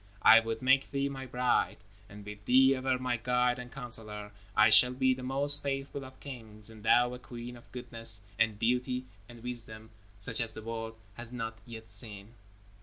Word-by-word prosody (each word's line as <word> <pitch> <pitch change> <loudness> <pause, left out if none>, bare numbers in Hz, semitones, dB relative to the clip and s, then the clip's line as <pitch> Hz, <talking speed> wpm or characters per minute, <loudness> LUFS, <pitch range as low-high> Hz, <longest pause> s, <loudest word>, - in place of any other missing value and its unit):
I 115 - +8
would 115 +1 -5
make 135 +1 +3
thee 140 0 -2
my 135 -1 -7
bride, 125 0 0 0.3
and 105 0 -12
with 105 0 -10
thee 130 +2 +5
ever 130 0 -1
my 125 -2 -2
guide 125 +1 0
and 125 0 -9
counselor, 110 -5 -3 0.2
I 105 - +5
shall 125 0 +6
be 130 0 +2
the 130 - -8
most 140 +3 +2
faithful 135 0 -4
of 130 0 -14
kings, 110 -5 -9
and 110 -1 -14
thou 120 +3 +3
a 125 - -8
queen 120 0 -9
of 120 - -18
goodness 115 -3 +5 0.2
and 110 -2 +1
beauty 125 +3 -1 0.2
and 120 -1 -14
wisdom 115 -2 -7 0.3
such 100 - -2
as 115 -1 +1
the 110 - -9
world 115 0 -6 0.2
has 120 0 -9
not 115 -2 -6
yet 110 -2 -11
seen." 105 0 -2
120 Hz, 185 wpm, -30 LUFS, 110-130 Hz, 0.3 s, I